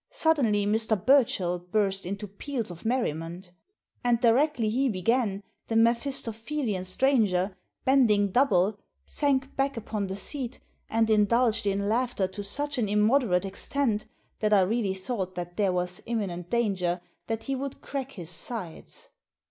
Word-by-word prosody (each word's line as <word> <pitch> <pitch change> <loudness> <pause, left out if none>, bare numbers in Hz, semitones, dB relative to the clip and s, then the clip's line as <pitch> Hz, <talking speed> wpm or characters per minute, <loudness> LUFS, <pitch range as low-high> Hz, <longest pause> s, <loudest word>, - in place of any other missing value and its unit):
Suddenly 240 -11 +2
Mr. 220 +1 +2
Burchell 195 -8 +3
burst 195 +1 -1
into 200 +2 -4
peals 225 +2 -4
of 170 +3 -11
merriment 175 - -2 0.5
And 240 -1 +3
directly 245 +1 +3
he 260 +5 +1
began 205 0 0 0.2
the 225 - -2
Mephisto 235 +2 +2
phelian 225 -4 -3
stranger, 200 -5 +2 0.3
bending 215 -7 +4
double, 205 -5 +3 0.3
sank 275 -2 0
back 275 -1 0
upon 215 -2 -3
the 190 - -4
seat 250 +5 -4 0.3
and 225 0 +2
indulged 220 +1 +3
in 200 0 0
laughter 230 -3 +1
to 195 +2 -7
such 285 +7 -1
an 215 -4 0
immoderate 210 -2 +3
extent 215 +3 -1 0.3
that 215 -1 +2
I 200 - +6
really 200 0 0
thought 190 -2 -3
that 175 0 -5
there 200 -1 +2
was 180 0 -2
imminent 185 -7 -3
danger 190 -7 0 0.3
that 225 -1 -3
he 275 - -2
would 270 0 -5
crack 275 -1 -5
his 175 -4 -6
sides. 180 0 -7
215 Hz, 145 wpm, -27 LUFS, 190-250 Hz, 0.5 s, I